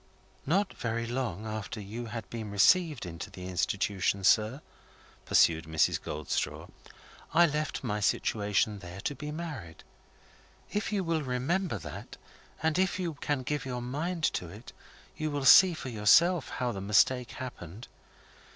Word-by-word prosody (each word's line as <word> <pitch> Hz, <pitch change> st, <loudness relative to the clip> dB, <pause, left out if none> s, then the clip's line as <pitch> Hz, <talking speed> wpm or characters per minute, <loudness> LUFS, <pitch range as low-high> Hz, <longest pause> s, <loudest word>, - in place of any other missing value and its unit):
"Not 190 Hz, +6 st, +1 dB
very 115 Hz, 0 st, -3 dB
long 115 Hz, -5 st, -3 dB
after 110 Hz, 0 st, -5 dB
you 110 Hz, +4 st, -6 dB
had 115 Hz, 0 st, -6 dB
been 110 Hz, -3 st, -5 dB
received 150 Hz, -, +3 dB
into 85 Hz, -1 st, -7 dB
the 90 Hz, 0 st, -9 dB
Institution, 95 Hz, +1 st, 0 dB
sir," 110 Hz, +7 st, +3 dB, 0.6 s
pursued 80 Hz, -1 st, +4 dB
Mrs. 80 Hz, 0 st, +1 dB
Goldstraw, 75 Hz, -1 st, -3 dB, 0.7 s
"I 170 Hz, +1 st, +7 dB
left 150 Hz, -2 st, -2 dB
my 105 Hz, -4 st, -1 dB
situation 105 Hz, 0 st, 0 dB
there, 90 Hz, 0 st, -9 dB
to 145 Hz, -, -2 dB
be 150 Hz, +2 st, -7 dB
married. 150 Hz, -, -7 dB, 0.9 s
If 210 Hz, +1 st, -2 dB
you 200 Hz, -3 st, 0 dB
will 165 Hz, -2 st, 0 dB
remember 145 Hz, +8 st, -1 dB
that, -, -, -9 dB, 0.5 s
and 160 Hz, +2 st, +1 dB
if 185 Hz, -1 st, +1 dB
you 175 Hz, -3 st, -2 dB
can 140 Hz, -2 st, -2 dB
give 150 Hz, +3 st, -2 dB
your 125 Hz, -2 st, -4 dB
mind 160 Hz, +7 st, -3 dB
to 90 Hz, -, -4 dB
it, 105 Hz, +7 st, -12 dB, 0.4 s
you 155 Hz, 0 st, -2 dB
will 145 Hz, -2 st, -3 dB
see 185 Hz, +4 st, +8 dB
for 135 Hz, -, -6 dB
yourself 135 Hz, -, +4 dB
how 125 Hz, -1 st, -2 dB
the 100 Hz, -3 st, -5 dB
mistake 120 Hz, +5 st, +2 dB
happened. 115 Hz, -4 st, -8 dB
120 Hz, 150 wpm, -29 LUFS, 100-155 Hz, 0.9 s, see